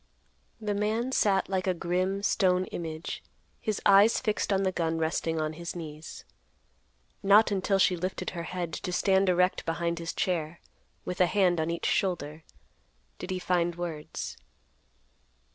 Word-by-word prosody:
The 210 -2 -2
man 215 +5 0
sat 195 -6 +2
like 190 -1 -1
a 185 - +2
grim, 185 +3 -1
stone 185 -3 +2
image, 160 -1 -5 0.4
his 215 -3 -2
eyes 200 +3 +6
fixed 215 -3 -1
on 195 0 +2
the 190 - +1
gun 165 -2 -1
resting 160 0 -1
on 155 0 -1
his 170 +2 -6
knees. 155 -2 -8 1.0
Not 205 +2 +5
until 195 0 +1
she 185 -1 +4
lifted 185 +2 -3
her 175 - -5
head 175 -2 -4
to 180 - -4
stand 190 +1 +3
erect 180 +1 +2
behind 170 +1 -2
his 165 0 -3
chair, 170 -2 -2 0.5
with 180 0 -2
a 180 - +6
hand 180 -3 +2
on 160 - -1
each 170 0 -3
shoulder, 165 -5 -1 0.8
did 180 - -6
he 185 - -1
find 175 -1 0
words. 170 -3 -5
180 Hz, 155 wpm, -28 LUFS, 170-195 Hz, 1.0 s, eyes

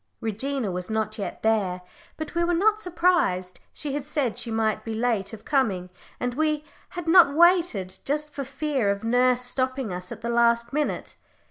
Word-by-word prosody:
Regina 225 +1 -2
was 180 +2 -4
not 220 0 -2
yet 200 - -5
there, 195 -5 +1 0.3
but 315 -1 -6
we 340 0 +1
were 345 0 +1
not 430 +4 +3
surprised: 335 - +1
she 290 -2 -4
had 290 -1 -2
said 280 -5 -1
she 235 - -5
might 220 -1 0
be 225 -1 -4
late 220 -4 0
of 220 -1 -11
coming, 195 -11 0 0.3
and 245 0 -1
we 305 +1 0 0.3
had 350 -2 -7
not 325 -4 +6
waited, 330 - +3
just 300 +1 -1
for 280 - -4
fear 270 -4 -1
of 200 +1 -1
nurse 250 +2 +3
stopping 255 -3 -1
us 180 0 -6
at - - -7
the 235 - -3
last 235 0 +2
minute. 300 0 -2
245 Hz, 185 wpm, -25 LUFS, 215-300 Hz, 0.3 s, not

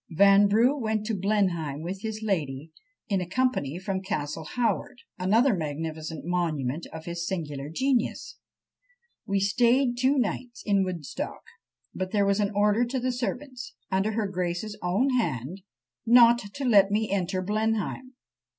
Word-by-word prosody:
Vanbrugh 200 - +5
went 220 -1 -1
to 225 - -1
Blenheim 180 -7 0
with 190 +3 -5
his 220 0 -5
lady, 155 -7 -2 0.4
in 195 -3 0
a 175 - -5
company 220 - 0
from 190 0 -3
Castle 160 -5 -4
Howard, 245 0 0 0.2
another 225 +8 +3
magnificent 160 0 -5
monument 165 -5 -1
of 160 0 -8
his 170 0 -4
singular 150 -6 -4
genius. 255 - -1 0.9
"We 200 0 +1
staid 240 +5 +2
two 265 +3 +3
nights 245 0 -2
in 200 -2 +3
Woodstock; 175 -6 -5 0.5
but 185 0 -3
there 205 0 +2
was 200 +1 +2
an 205 -1 +2
order 210 +3 +3
to 250 +2 -2
the 255 +1 0
servants, 250 0 -5 0.2
under 195 +3 +1
her 220 0 0
grace's 180 +2 -3
own 200 +10 +1
hand, 145 - -3 0.4
not 235 0 +7 0.2
to 280 -1 -3
let 200 -5 +5
me 215 +1 0
enter 185 -1 -1
Blenheim! 220 +5 -2
200 Hz, 145 wpm, -27 LUFS, 170-230 Hz, 0.9 s, not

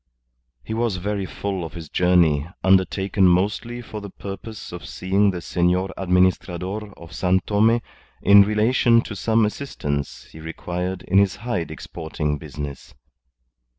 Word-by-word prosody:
He - - -5
was 115 -3 0
very 100 +1 -2
full 95 -2 -4
of 80 -2 -7
his 85 -3 -8
journey, 85 -4 +3 0.2
undertaken 95 0 +3
mostly 105 +7 0
for 105 -2 -7
the 100 - -7
purpose 100 +3 -8
of 85 -2 -8
seeing 95 +4 +1
the 90 -2 -3
Senor 90 +2 +1
Administrador 95 +2 0
of 85 0 -12
San 95 0 +2
Tome 110 +4 +3 0.4
in 100 +1 +8
relation 115 +3 +3
to 110 - -7
some 110 +2 +2
assistance 75 - -4
he 80 - -12
required 90 +3 -4
in 95 +2 +3
his 100 -2 +2
hide 105 -6 -3
exporting 80 -2 -4
business. 70 -2 -8
95 Hz, 140 wpm, -23 LUFS, 85-105 Hz, 0.4 s, in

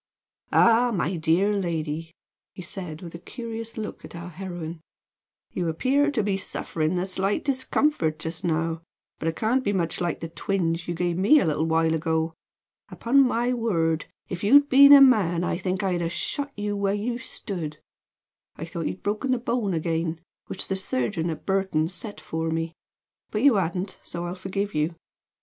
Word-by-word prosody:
"Ah, 235 +1 +5
my 185 -3 0
dear 170 +5 +2
lady!" 165 -3 -2 0.4
he 185 - -7
said, 175 -2 -7
with 170 - -8
a 170 - -7
curious 230 +2 -7
look 215 -1 -5
at - - -10
our 170 +1 -7
heroine, 175 -2 -6 0.7
"you 175 -2 -1
appear 270 - +2
to 250 -7 0
be 195 -1 0
suffering 165 -2 -2
a 180 - 0
slight 195 +5 -1
discomfort 260 - +1
just 160 +3 -5
now, 165 -1 0 0.4
but 160 - -2
it 165 - 0
can't 245 +4 +1
be 205 - +1
much 175 -4 -1
like 175 -2 -1
the 165 - -5
twinge 165 -1 -1
you 175 - -2
gave 175 0 -1
me 285 +11 +6
a - - +1
little 160 0 0
while 160 0 +2
ago. 160 0 0 0.6
Upon 270 +4 +3
my 250 -1 +2
word, 170 -9 0 0.2
if 180 +1 -5
you'd 285 +7 +6
been 280 +2 +8
a 285 -1 +11
man 195 -10 +5
I - - 0
think 190 +1 -2
I 190 - +1
should 175 - -1
have 165 0 -1
shot 285 +10 -2
you 205 0 -2
where 200 0 0
you 235 +4 -2
stood. 170 -11 -5 0.8
I 160 - -6
thought 165 0 -4
you'd 185 - -6
broken 210 +6 -1
the 255 - +3
bone 235 -5 -1
again, 165 0 -1 0.3
which - - -5
the 190 - -1
surgeon 190 -4 -1
at 160 - -6
Burton 190 -5 +1
set 205 +3 -7
for 160 0 -3
me; 165 0 -2 0.6
but 215 +2 -2
you 285 -2 +7
hadn't, 185 0 -1
so 170 0 -5
I'll 175 - -3
forgive 190 +2 -3
you. 155 +3 0
185 Hz, 185 wpm, -25 LUFS, 165-220 Hz, 0.8 s, a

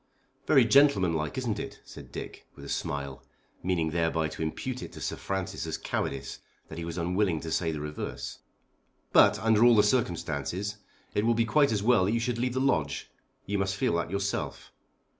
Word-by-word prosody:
"Very - - +6
gentlemanlike, 95 - +3
isn't 115 -5 -1
it?" - - -6
said - - -12
Dick, - - -8
with - - -11
a - - -8
smile, 70 -1 -3 0.4
meaning 85 -4 0
thereby 80 -1 0
to 80 - -8
impute 125 +11 -3
it - - -7
to - - -9
Sir - - -3
Francis 95 -2 -3
as 80 - -2
cowardice 70 0 -3 0.3
that 80 - -7
he - - -4
was 85 0 -5
unwilling 90 0 +1
to 80 - -5
say 80 0 +1
the 75 -2 -4
reverse. 75 -4 -5 0.7
"But, - - +7
under 110 0 +3
all 120 -1 +7
the 105 - +6
circumstances, 95 - -1 0.4
it 105 - +1
will 115 +1 +3
be 115 0 +2
quite 140 +4 +3
as 105 -2 0
well 115 -5 +4
that 105 - +1
you 115 - +2
should 120 0 -1
leave 125 +1 -1
the - - +1
Lodge. 80 - 0 0.3
You 100 +1 -1
must 95 0 0
feel 100 - +1
that 85 - -2
yourself." 100 +1 -3
95 Hz, 195 wpm, -28 LUFS, 80-115 Hz, 0.7 s, But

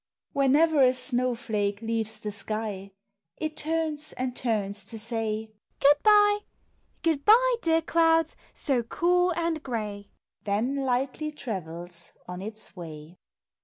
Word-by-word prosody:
Whenever 285 +3 +4
a 255 0 +5
snow 255 -1 0
flake 205 -3 -1
leaves 225 -1 -2
the 210 - -4
sky, 205 -2 -4 0.5
It 310 -1 -3
turns 310 -1 -2
and 250 -1 -3
turns 205 -4 -1
to 225 - -8
say 220 -1 -3
" - - -47
Good 290 +1 +5
bye! 415 -1 +6 0.6
Good 320 -5 +1
bye, - - +6
dear 325 -1 +2
clouds, 325 -1 +3 0.2
so 265 -5 0
cool 355 +9 +2
and 335 -2 -1
gray! 210 -6 -4 0.2
" - - -51
Then 215 +7 0
lightly 270 +3 -1
travels 175 - -6
on 180 0 -6
its 215 0 -7
way. 160 -1 -9
250 Hz, 135 wpm, -27 LUFS, 210-310 Hz, 0.6 s, bye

